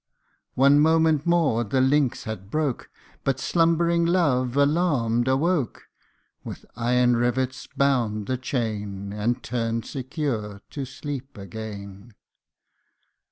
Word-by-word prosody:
One 140 +2 +5
moment 160 0 +3
more 160 -9 +3
the 120 +4 0
links 135 0 +2
had 105 -3 -7
broke, 150 -1 -2 0.3
But 135 -1 0
slumbering 170 +3 +2
Love, 140 -8 +1
alarmed, 140 -6 +2
awoke; 140 0 0 0.6
With - - -8
iron 120 +1 +2
rivets 125 +2 -1
bound 120 -7 +1
the 130 - -1
chain, 105 -6 -3
And 120 +4 -1
turned 115 -1 -2
secure 130 - -4
to 140 -2 -4
sleep 135 0 -7
again. 100 +1 -8
130 Hz, 110 wpm, -25 LUFS, 115-145 Hz, 0.6 s, One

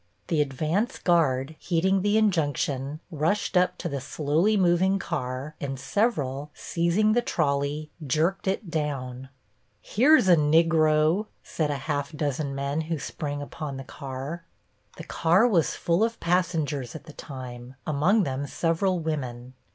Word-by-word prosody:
The 160 -3 +2
advance 155 - -1
guard, 155 -4 +1
heeding 190 +3 +1
the 205 +2 +2
injunction, 150 -7 0
rushed 165 +7 0
up 180 0 +3
to 175 - -4
the 140 -4 -3
slowly 155 +10 +1
moving 185 +1 +3
car, 140 -5 -4
and 135 -2 -4
several, 145 - -1
seizing 175 +6 +1
the 240 - +3
trolley, 145 -5 -1
jerked 160 +8 0
it 190 -2 -2
down. 135 -5 -3 0.5
"Here's 265 0 +4
a 180 - +7
Nigro!" 155 +3 +3 0.2
said 155 -2 -2
half 145 +1 -3
a - - -10
dozen 145 -1 -2
men 140 +3 -1
who 160 +1 -3
sprang 145 0 -4
upon 145 -1 -6
the 135 - -6
car. 140 +5 -6 0.5
The - - -7
car 175 +8 +3
was 175 -9 +2
full 170 +5 +1
of 230 0 -1
passengers 160 -8 0
at 160 - -8
the 155 - -12
time, 130 -3 -9
among 165 +9 +3
them 140 -1 -3
several 170 +5 0
women. 130 -6 -4
155 Hz, 145 wpm, -26 LUFS, 140-180 Hz, 0.5 s, a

